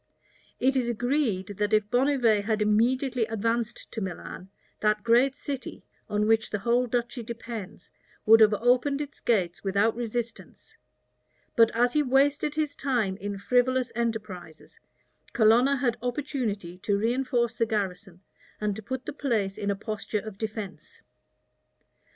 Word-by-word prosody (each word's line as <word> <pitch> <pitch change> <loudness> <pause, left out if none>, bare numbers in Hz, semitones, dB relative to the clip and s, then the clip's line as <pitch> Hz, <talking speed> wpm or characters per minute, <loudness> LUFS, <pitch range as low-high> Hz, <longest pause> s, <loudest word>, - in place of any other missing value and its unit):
It 265 +2 +2
is 250 -2 +1
agreed, 235 -5 -1
that 210 +1 0
if 215 -1 +2
Bonnivet 245 -5 +3
had 220 0 0
immediately 235 +3 +2
advanced 230 +1 -2
to 225 - -5
Milan, 185 0 -6 0.3
that 210 0 +1
great 245 +4 +4
city, 275 -2 -6 0.2
on 210 0 +1
which 225 +1 +2
the 210 - -2
whole 240 +5 +1
duchy 240 +1 -2
depends, 225 -4 -8 0.3
would 225 +1 +8
have 215 -1 +6
opened 250 +5 +2
its 290 -1 -6
gates 185 -7 0
without 200 +3 +2
resistance: 235 0 -5 0.8
but 230 -2 +6
as 245 +1 +3
he 300 - +3
wasted 285 +2 +2
his 300 -2 -1
time 240 -9 0
in 200 0 -5
frivolous 250 +4 +1
enterprises, 210 -8 -5 0.5
Colonna 240 +5 +5
had 245 -2 0
opportunity 235 - -3
to 200 +1 0
reënforce 240 +1 0
the 230 - +1
garrison, 195 -3 -3 0.4
and 210 -1 -1
to 220 - -7
put 260 +4 -5
the - - -5
place 220 -9 -1
in 205 - -3
a 200 - +1
posture 215 0 -4
of 215 -3 -8
defence. 215 -3 -6
230 Hz, 145 wpm, -27 LUFS, 210-250 Hz, 0.8 s, would